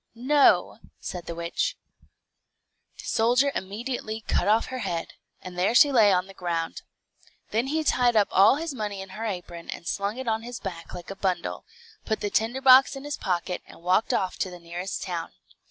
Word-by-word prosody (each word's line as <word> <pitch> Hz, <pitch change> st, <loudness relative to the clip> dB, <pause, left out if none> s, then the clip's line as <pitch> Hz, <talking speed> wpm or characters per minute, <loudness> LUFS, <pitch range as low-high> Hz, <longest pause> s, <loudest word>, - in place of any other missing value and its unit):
"No," 275 Hz, +5 st, +3 dB, 0.2 s
said 175 Hz, -2 st, -6 dB
the 170 Hz, -, -4 dB
witch. 170 Hz, 0 st, -2 dB, 1.2 s
The -, -, -10 dB
soldier 245 Hz, +5 st, +3 dB
immediately 220 Hz, +2 st, -4 dB
cut -, -, +1 dB
off 220 Hz, +2 st, +4 dB
her 255 Hz, -, -3 dB
head, 175 Hz, -7 st, -3 dB, 0.3 s
and 180 Hz, -1 st, -7 dB
there 195 Hz, +6 st, +2 dB
she 290 Hz, +1 st, +7 dB
lay 220 Hz, -6 st, +6 dB
on 180 Hz, -1 st, +2 dB
the 195 Hz, -, -13 dB
ground. 170 Hz, -3 st, -3 dB, 0.7 s
Then 230 Hz, +4 st, 0 dB
he 315 Hz, +3 st, 0 dB
tied 245 Hz, -5 st, +3 dB
up 210 Hz, -2 st, +4 dB
all 195 Hz, +6 st, +6 dB
his 320 Hz, 0 st, -4 dB
money 210 Hz, -5 st, -4 dB
in 195 Hz, -, -13 dB
her 215 Hz, +4 st, -6 dB
apron, 175 Hz, -4 st, -6 dB
and -, -, -6 dB
slung 200 Hz, +3 st, -2 dB
it 260 Hz, -1 st, -6 dB
on 220 Hz, 0 st, 0 dB
his 240 Hz, +1 st, -7 dB
back 170 Hz, -4 st, -7 dB
like 180 Hz, +1 st, -8 dB
a -, -, -6 dB
bundle, 190 Hz, -2 st, -2 dB, 0.4 s
put 220 Hz, -, -1 dB
the 205 Hz, -, -2 dB
tinderbox 260 Hz, +4 st, +5 dB
in 270 Hz, -, -8 dB
his 290 Hz, 0 st, -3 dB
pocket, 180 Hz, -1 st, -2 dB
and -, -, -15 dB
walked 185 Hz, +5 st, +2 dB
off 185 Hz, -1 st, -1 dB
to 185 Hz, -, -1 dB
the 180 Hz, -, -9 dB
nearest 175 Hz, +3 st, -5 dB
town. 175 Hz, -3 st, -4 dB
205 Hz, 190 wpm, -26 LUFS, 180-245 Hz, 1.2 s, she